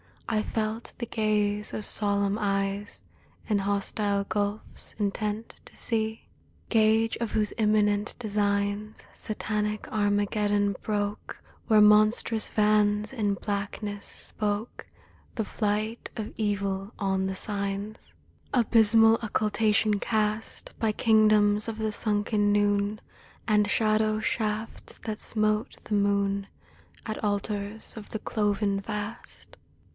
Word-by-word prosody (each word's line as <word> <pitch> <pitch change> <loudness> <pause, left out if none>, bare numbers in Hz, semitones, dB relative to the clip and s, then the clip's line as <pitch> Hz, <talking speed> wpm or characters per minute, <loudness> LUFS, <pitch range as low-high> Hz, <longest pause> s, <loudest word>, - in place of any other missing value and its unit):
I 215 -2 +1
felt 220 +1 -3
the 235 - -3
gaze 210 -2 0
of 215 - -4
solemn 200 0 +1
eyes 195 0 -1 0.4
In 210 -2 +2
hostile 200 0 0
gulfs 205 +1 -4
intent 210 +1 -3
to - - -15
see; 220 -1 -1 0.4
Gage 220 0 +3
of 235 -2 -3
whose 210 -1 +1
imminent 210 -1 +2
designs, 205 -1 -1
Satanic 210 0 -3
Armageddon 205 -1 +1
broke, 205 -1 -3 0.2
Where 215 -2 +6
monstrous 215 +1 +4
vans 210 +1 +2
in 210 -5 0
blackness 205 0 -4
spoke 210 +2 -4 0.5
The 225 - 0
flight 215 +2 -2
of 220 -2 -5
Evil 200 -1 -2
on 190 -1 0
the 190 - -3
Signs 200 +1 -3 0.2
— - - -33
Abysmal 225 -1 +6
occultation 215 -1 +1
cast 215 0 -1
By 220 -2 +1
kingdoms 215 -1 +4
of 225 -1 -4
the 220 -1 -1
sunken 210 -1 +1
noon, 205 0 +1 0.5
And 210 -1 +3
shadow 215 0 +2
shafts 220 0 -3
that 215 -2 -4
smote 215 0 0
the - - -5
moon 200 -1 +1 0.6
At 215 0 -5
altars 205 +1 -2
of 210 - -9
the 220 - -4
cloven 205 -2 0
Vast! 210 +1 -7
210 Hz, 115 wpm, -27 LUFS, 205-215 Hz, 0.6 s, Where